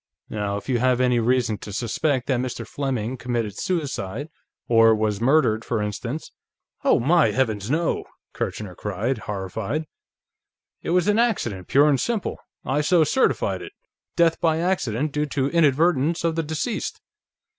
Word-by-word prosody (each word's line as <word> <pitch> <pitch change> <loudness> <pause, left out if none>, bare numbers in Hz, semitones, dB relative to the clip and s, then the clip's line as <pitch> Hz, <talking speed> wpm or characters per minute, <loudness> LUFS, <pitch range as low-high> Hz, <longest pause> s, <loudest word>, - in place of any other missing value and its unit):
"Now, 100 -1 -2
if - - -9
you 125 -3 +1
have 125 0 +2
any 125 -1 +3
reason 115 -2 +1
to 105 - -8
suspect 125 +5 -1
that 130 -3 +1
Mr. 130 0 -4
Fleming 130 -3 -2
committed 120 -4 -2
suicide... 145 - -3 0.4
or 115 -1 +6
was 105 -1 -1
murdered, 120 -4 +3
for 115 -2 -1
instance 115 +8 -4 0.3
..." - - -46
"Oh, - - +4
my 160 +6 +4
heavens, 110 -5 -1
no!" 165 +4 0 0.3
Kirchner 105 -4 -4
cried, 105 +7 -2
horrified. 105 - -3 1.0
"It - - -5
was 180 +1 +2
an 210 +2 +3
accident, 120 - 0
pure 145 +2 +5
and 140 -3 +3
simple; 225 - -2 0.3
I 145 +3 +1
so 165 +2 +4
certified 255 - +1
it. - - -9 0.4
Death 165 -1 +3
by 160 -1 +3
accident, 155 - 0
due 150 +1 -1
to 140 -1 0
inadvertence 160 0 +3
of 165 -1 +1
the 165 - +1
deceased." 155 -1 -3
130 Hz, 155 wpm, -23 LUFS, 110-155 Hz, 1.0 s, or